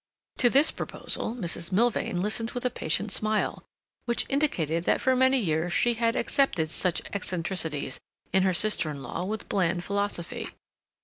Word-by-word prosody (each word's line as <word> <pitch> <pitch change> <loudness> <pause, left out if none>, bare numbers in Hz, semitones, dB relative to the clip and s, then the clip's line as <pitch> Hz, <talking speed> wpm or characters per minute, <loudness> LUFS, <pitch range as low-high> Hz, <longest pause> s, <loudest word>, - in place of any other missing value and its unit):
To 245 - +4
this 280 +5 +5
proposal 230 - -3
Mrs. 170 -5 0
Milvain 200 -3 +1
listened 225 +2 +1
with 245 - -3
a 250 - +1
patient 195 +3 -1
smile, 215 0 0 0.4
which 235 -1 +1
indicated 170 - 0
that - - +2
for 260 0 +2
many 260 +1 +4
years 170 -5 0
she 240 - +3
had 230 0 0
accepted 210 - +1
such 180 -1 0
eccentricities 175 -5 -2 0.3
in 190 - +4
her 190 0 +3
sister 185 -3 +2
in 140 -2 -6
law 180 - -4
with 215 +2 -4
bland 175 -2 0
philosophy. 200 -3 -3
200 Hz, 160 wpm, -27 LUFS, 170-235 Hz, 0.4 s, this